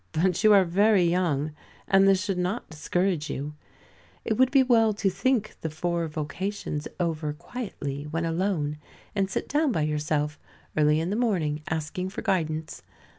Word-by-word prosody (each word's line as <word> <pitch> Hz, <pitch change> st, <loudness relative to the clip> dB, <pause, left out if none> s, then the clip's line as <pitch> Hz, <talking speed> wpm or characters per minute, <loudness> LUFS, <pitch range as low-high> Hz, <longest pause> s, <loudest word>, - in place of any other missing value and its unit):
But 180 Hz, +4 st, +1 dB
you 215 Hz, -, +7 dB
are 195 Hz, -2 st, +6 dB
very 200 Hz, +2 st, +4 dB
young, 170 Hz, -4 st, +1 dB, 0.4 s
and 195 Hz, 0 st, +5 dB
this 195 Hz, -1 st, +4 dB
should 195 Hz, -3 st, -1 dB
not 180 Hz, +2 st, -2 dB
discourage 165 Hz, +1 st, -1 dB
you. 145 Hz, +2 st, -4 dB, 0.7 s
It -, -, +1 dB
would 260 Hz, +3 st, +4 dB
be 270 Hz, 0 st, +5 dB
well 225 Hz, -4 st, +4 dB
to 200 Hz, -2 st, +1 dB
think 215 Hz, +3 st, 0 dB
the 160 Hz, -, -2 dB
four 170 Hz, +2 st, -1 dB
vocations 155 Hz, +1 st, -4 dB
over 160 Hz, -3 st, -1 dB
quietly, 150 Hz, -, -6 dB
when 165 Hz, +2 st, -2 dB
alone, 165 Hz, -3 st, -1 dB, 0.3 s
and 195 Hz, -2 st, 0 dB
sit -, -, -3 dB
down 295 Hz, 0 st, +2 dB
by 160 Hz, -9 st, 0 dB
yourself 150 Hz, 0 st, -1 dB, 0.4 s
early 150 Hz, 0 st, +4 dB
in 165 Hz, +3 st, -1 dB
the -, -, 0 dB
morning 175 Hz, -11 st, 0 dB
asking 160 Hz, +4 st, -3 dB
for 195 Hz, -, -6 dB
guidance. 160 Hz, -4 st, -1 dB
175 Hz, 165 wpm, -26 LUFS, 155-200 Hz, 0.7 s, you